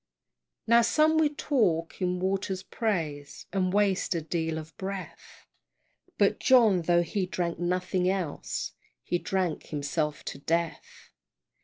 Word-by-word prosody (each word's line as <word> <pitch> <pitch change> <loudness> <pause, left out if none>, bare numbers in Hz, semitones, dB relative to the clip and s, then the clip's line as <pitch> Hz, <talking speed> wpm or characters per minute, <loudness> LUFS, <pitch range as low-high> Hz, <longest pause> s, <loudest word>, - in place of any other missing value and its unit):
Now 235 +1 +6
some 310 +6 +3
will 310 -2 +4
talk 180 - 0
in 180 0 0
water's 190 0 -1
praise, 160 -11 -3
And 185 -2 +1
waste 200 -3 +2
a 165 - -1
deal 160 0 -2
of 160 0 -8
breath, 195 0 -7 0.7
But - - +3
John, 225 -8 +5
tho' 175 +1 +3
he 185 +2 -2
drank 175 -2 -2
nothing 180 +1 0
else, 185 -6 -3 0.3
He 175 - -1
drank 185 -4 -2
himself 150 0 -2
to 140 - -6
death! 165 +2 -3
180 Hz, 130 wpm, -28 LUFS, 165-195 Hz, 0.7 s, Now